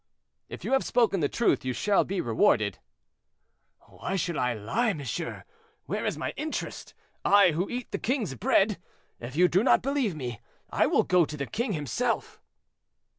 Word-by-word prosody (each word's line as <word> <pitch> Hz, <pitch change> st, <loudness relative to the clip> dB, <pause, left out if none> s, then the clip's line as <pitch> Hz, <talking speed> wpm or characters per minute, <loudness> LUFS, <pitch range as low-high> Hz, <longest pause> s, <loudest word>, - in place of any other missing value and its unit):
"If -, -, -8 dB
you -, -, -2 dB
have 270 Hz, -, +3 dB
spoken 225 Hz, -6 st, +2 dB
the 145 Hz, -3 st, +1 dB
truth 235 Hz, -, +1 dB
you 130 Hz, 0 st, -2 dB
shall 205 Hz, +9 st, +2 dB
be 195 Hz, 0 st, -2 dB
rewarded." 110 Hz, -3 st, +2 dB, 1.0 s
"Why 195 Hz, -, -6 dB
should 175 Hz, -2 st, -1 dB
I 125 Hz, -3 st, 0 dB
lie, 200 Hz, -, 0 dB
monsieur; 150 Hz, +2 st, -5 dB, 0.4 s
where -, -, -2 dB
is -, -, -2 dB
my -, -, -3 dB
interest—I, 205 Hz, -, 0 dB
who 175 Hz, +5 st, -2 dB
eat 245 Hz, -1 st, -5 dB
the -, -, -2 dB
king's 240 Hz, -, -1 dB
bread? 195 Hz, -, +2 dB, 0.4 s
If 120 Hz, +3 st, -8 dB
you 180 Hz, +3 st, +5 dB
do 180 Hz, +2 st, +2 dB
not 260 Hz, -, +4 dB
believe 270 Hz, -, 0 dB
me, 120 Hz, -6 st, -5 dB, 0.3 s
I -, -, +3 dB
will -, -, +3 dB
go 180 Hz, -1 st, +4 dB
to 150 Hz, -, -7 dB
the 140 Hz, -, -2 dB
king 220 Hz, -, -2 dB
himself." 145 Hz, -6 st, -2 dB
180 Hz, 170 wpm, -27 LUFS, 135-220 Hz, 1.0 s, you